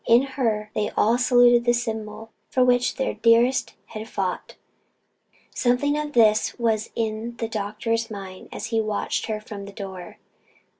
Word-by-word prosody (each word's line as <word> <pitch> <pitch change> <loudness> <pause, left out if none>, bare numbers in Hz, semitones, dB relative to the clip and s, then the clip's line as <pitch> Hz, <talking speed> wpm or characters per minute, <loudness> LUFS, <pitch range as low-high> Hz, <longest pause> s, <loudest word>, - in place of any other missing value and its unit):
In 235 +3 +6
her, 215 -5 -1
they 210 - -1
all 230 +3 +3
saluted 245 -1 +5
the 240 0 +3
symbol 225 -1 -5 0.2
for 255 -1 +3
which 245 0 +2
their 265 - -1
dearest 235 +3 +3
had 220 0 -8
fought. 190 -2 -3 1.0
Something 250 +4 +1
of 300 0 -3
this 220 -2 +3
was 225 -2 0
in 225 +1 -3
the 225 - -2
doctor's 220 +2 -2
mind 195 -3 -9
as - - -5
he 225 - +3
watched 215 -1 -2
her 215 -1 -2
from 210 -2 -8
the 200 - -9
door. 190 -3 -8
225 Hz, 155 wpm, -24 LUFS, 215-240 Hz, 1.0 s, In